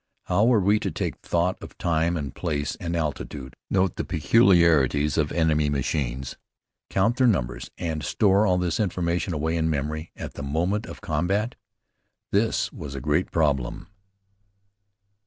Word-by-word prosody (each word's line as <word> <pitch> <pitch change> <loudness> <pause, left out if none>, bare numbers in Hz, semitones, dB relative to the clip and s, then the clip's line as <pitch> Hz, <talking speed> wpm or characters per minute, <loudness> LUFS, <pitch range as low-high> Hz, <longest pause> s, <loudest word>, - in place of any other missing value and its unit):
How 100 +4 +2
were 120 -2 +5
we 100 +2 +3
to - - -2
take - - -3
thought 85 +2 -1
of - - -11
time 85 +1 +1
and 70 -3 -4
place 75 -4 -2
and 85 -1 -3
altitude, 75 -4 -4
note 95 -2 +1
the - - -1
peculiarities 80 - +4
of 75 -2 +1
enemy 80 -3 +2
machines, 65 -2 -2 0.5
count 110 +6 +1
their 130 - +4
numbers, 70 - -1
and 80 -3 -3
store 100 +5 +3
all 90 -1 +3
this 90 -2 -1
information 90 -3 -1
away 80 +1 -1
in 80 -1 +1
memory 75 +2 -3
at - - -7
the - - -7
moment 85 - -1
of - - -9
combat? 95 +9 0 0.8
This 100 -2 +1
was 75 -5 -7
a - - -3
great 75 +7 0
problem. 75 +2 0
85 Hz, 155 wpm, -25 LUFS, 75-95 Hz, 0.8 s, were